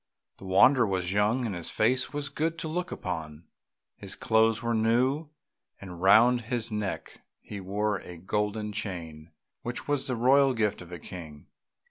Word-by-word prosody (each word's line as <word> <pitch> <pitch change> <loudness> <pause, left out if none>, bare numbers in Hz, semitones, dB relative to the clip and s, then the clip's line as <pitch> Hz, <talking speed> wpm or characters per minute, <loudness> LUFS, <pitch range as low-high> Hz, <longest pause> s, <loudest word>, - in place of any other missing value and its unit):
The - - -11
wanderer 115 +6 +5
was 95 -1 -1
young, 105 +5 +2
and 110 - -2
his 85 -2 -3
face 125 +4 +1
was 145 -1 -4
good 165 +2 -2
to 165 0 -4
look 175 +3 -3
upon; 80 -4 -5 0.5
his - - -8
clothes 110 0 +2
were 115 0 0
new, 125 +7 +1 0.5
and 90 -3 -9
round 120 +6 +6
his 115 0 -3
neck 105 -2 -4 0.2
he 105 - -8
wore 100 +2 -1
a 90 -1 -10
golden 105 +4 -2
chain 85 -7 -6 0.3
which 120 +1 -5
was 145 -2 0
the 130 - -1
royal 135 +3 +4
gift 105 -4 0
of 90 0 -12
a 90 - -6
King. 80 -3 -10
110 Hz, 165 wpm, -28 LUFS, 95-125 Hz, 0.5 s, round